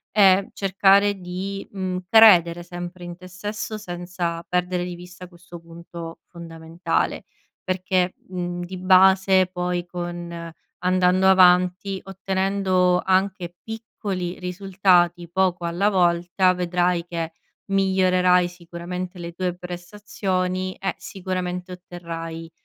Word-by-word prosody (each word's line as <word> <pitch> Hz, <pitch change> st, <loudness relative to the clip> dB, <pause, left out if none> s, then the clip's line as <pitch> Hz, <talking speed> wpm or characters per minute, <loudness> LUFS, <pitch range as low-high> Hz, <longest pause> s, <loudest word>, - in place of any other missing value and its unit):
e 195 Hz, -2 st, +5 dB
cercare 195 Hz, +1 st, +3 dB
di, 185 Hz, +2 st, -5 dB
mhmm, 185 Hz, -2 st, -3 dB
credere 180 Hz, -6 st, +6 dB
sempre 175 Hz, +1 st, -8 dB
in 175 Hz, 0 st, -7 dB
te 185 Hz, +1 st, -12 dB
stesso 205 Hz, +4 st, -5 dB
senza 175 Hz, -3 st, -4 dB
perdere 180 Hz, 0 st, -1 dB
di 180 Hz, -, -5 dB
vista 180 Hz, +1 st, -11 dB
questo 175 Hz, 0 st, -13 dB
punto 170 Hz, 0 st, -10 dB
fondamentale. 165 Hz, 0 st, -3 dB, 0.4 s
Perché, 185 Hz, 0 st, 0 dB, 0.2 s
mhmm, 175 Hz, -1 st, -4 dB
di 185 Hz, +1 st, -7 dB
base 190 Hz, 0 st, +5 dB
poi, 180 Hz, -1 st, -3 dB
con 175 Hz, -1 st, -6 dB, 0.3 s
andando 185 Hz, +1 st, +3 dB
avanti, 185 Hz, +1 st, +4 dB
ottenendo 190 Hz, -1 st, 0 dB
anche 185 Hz, -2 st, 0 dB
piccoli 205 Hz, -5 st, -5 dB
risultati, 180 Hz, -2 st, +1 dB
poco 180 Hz, -1 st, +1 dB
alla 175 Hz, +5 st, +1 dB
volta 180 Hz, 0 st, +2 dB
vedrai 180 Hz, -1 st, 0 dB
che 165 Hz, -1 st, -4 dB, 0.4 s
migliorerai 185 Hz, -2 st, +3 dB
sicuramente 180 Hz, +1 st, -7 dB
le 170 Hz, -1 st, -6 dB
tue 180 Hz, +1 st, -3 dB
prestazioni 185 Hz, 0 st, -3 dB
e 195 Hz, -1 st, -3 dB
sicuramente 185 Hz, -1 st, -5 dB
otterrai 165 Hz, -2 st, -8 dB
180 Hz, 110 wpm, -23 LUFS, 175-190 Hz, 0.4 s, credere